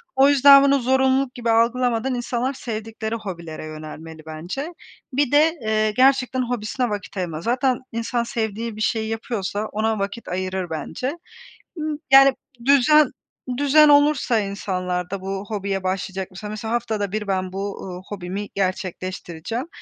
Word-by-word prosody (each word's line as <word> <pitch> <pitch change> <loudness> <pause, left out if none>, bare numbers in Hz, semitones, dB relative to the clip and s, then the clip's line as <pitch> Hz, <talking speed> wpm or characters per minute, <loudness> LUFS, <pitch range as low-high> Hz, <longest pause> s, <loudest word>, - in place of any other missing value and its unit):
O 270 +1 +6
yüzden 280 0 +8
bunu 280 0 +4
zorunluluk 265 +1 +2
gibi 235 -2 -2
algılamadan 240 +2 +2
insanlar 245 +2 -2
sevdikleri 220 -2 -5
hobilere 170 -8 -7
yönelmeli 155 +1 -9
bence. 175 - -5 0.4
Bir 275 -1 +1
de, 315 +3 +4
eee, 215 0 +1
gerçekten 260 +2 +3
hobisine 245 +1 -2
vakit 205 -1 -5
ayırma. 165 -4 -3
Zaten 250 +4 +1
insan 230 +1 -1
sevdiği 225 -1 -3
bir 215 - -7
şeyi 220 0 0
yapıyorsa 215 -2 -3
ona 220 0 0
vakit 200 +4 -4
ayırır 185 -1 -3
bence. 250 - -3 0.7
Imm, 310 -2 -2 0.2
yani, 270 -1 +8 0.3
düzen 280 +2 +5 0.5
düzen 290 +2 +6
olursa 290 -5 +4
insanlarda 185 -2 -3
bu 195 +1 -4
hobiye 200 -2 -2
başlayacak 190 0 -3 0.2
mesela 220 +2 -4
haftada 215 -4 -1
1 215 -1 -2
ben 185 -1 -1
bu, 195 +1 -4
ııı, 180 -1 -7
hobimi 195 +1 -5
gerçekleştireceğim. 185 - -3
220 Hz, 135 wpm, -22 LUFS, 190-260 Hz, 0.7 s, yüzden